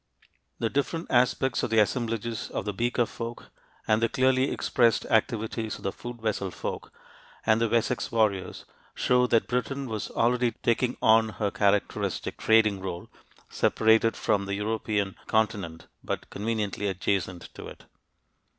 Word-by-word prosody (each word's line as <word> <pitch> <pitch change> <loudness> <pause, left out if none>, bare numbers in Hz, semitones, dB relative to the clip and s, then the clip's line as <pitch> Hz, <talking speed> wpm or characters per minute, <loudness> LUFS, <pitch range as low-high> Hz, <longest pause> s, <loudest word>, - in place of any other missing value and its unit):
The 115 -1 -1
different 165 +5 -2
aspects 125 +1 +2
of - - -1
the 115 - +1
assemblages 115 +1 0
of - - -4
the 105 - -2
Beaker 120 +3 +1
folk 115 +1 -7 0.4
and 110 +1 +3
the 115 - +2
clearly 130 0 +2
expressed 115 -4 +2
activities 110 -1 0
of - - -15
the 95 - -1
Food 120 +2 -8
vessel 100 -3 -1
folk - - -6 0.5
and 110 0 +3
the 115 - +2
Wessex 120 +2 0
warriors 105 -5 0 0.3
show 125 0 +3
that 115 -2 +2
Britain 125 +3 -2
was 110 -4 -4
already 120 0 +1
taking 120 +1 +1
on 110 0 +5
her 105 -2 -2
characteristic 100 0 0
trading 110 -3 +4
role, 95 -2 -6 0.4
separated 110 0 +3
from 100 -1 +1
the 100 - -1
European 105 -1 -1
continent 100 -7 -1 0.2
but - - -4
conveniently 105 -1 -2
adjacent 95 -2 -2
to - - -9
it. - - -12
110 Hz, 145 wpm, -27 LUFS, 105-120 Hz, 0.5 s, on